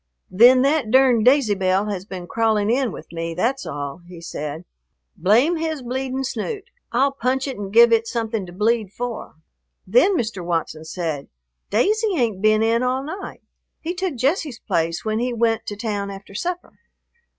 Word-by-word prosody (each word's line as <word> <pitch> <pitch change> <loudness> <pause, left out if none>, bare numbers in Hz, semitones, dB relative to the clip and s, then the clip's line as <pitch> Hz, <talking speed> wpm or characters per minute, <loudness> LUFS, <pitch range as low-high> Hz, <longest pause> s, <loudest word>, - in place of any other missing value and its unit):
"Then 245 +6 +7
that 280 -4 +1
durned 250 -2 +4
Daisy 255 -4 +5
Belle 190 +1 +1
has 190 -2 -4
been 185 -3 -7
crawling 220 +1 +1
in 255 -2 +1
with - - -10
me, 165 0 -4
that's 255 +9 -1
all," 145 +3 -5
he 175 -1 -11
said. 155 0 -6 0.5
"Blame 250 - +3
his 315 -4 -3
bleeding 260 +2 -3
snoot. 325 - -4 0.3
I'll 270 +4 +2
punch 265 +1 -1
it 270 - -4
and 195 -1 -5
give 235 +2 +7
it 230 0 +2
something 225 -5 -2
to - - -10
bleed 210 +2 0
for." 240 -4 -6 0.5
Then 405 -6 +4
Mr. 220 - -3
Watson 165 -2 -2
said, 160 -4 -4 0.4
"Daisy 415 - +2
ain't 225 -7 0
been 215 0 +4
in 230 +1 +2
all 255 +1 0
night. 350 +7 -7 0.4
He 335 +2 -4
took 365 -4 -3
Jesse's 275 +1 0
place 170 -2 -1
when 215 0 0
he 245 +1 -1
went 225 -1 0
to 205 - -4
town 205 -2 -3
after 200 0 -10
supper." 350 - -5
230 Hz, 175 wpm, -22 LUFS, 195-265 Hz, 0.5 s, Then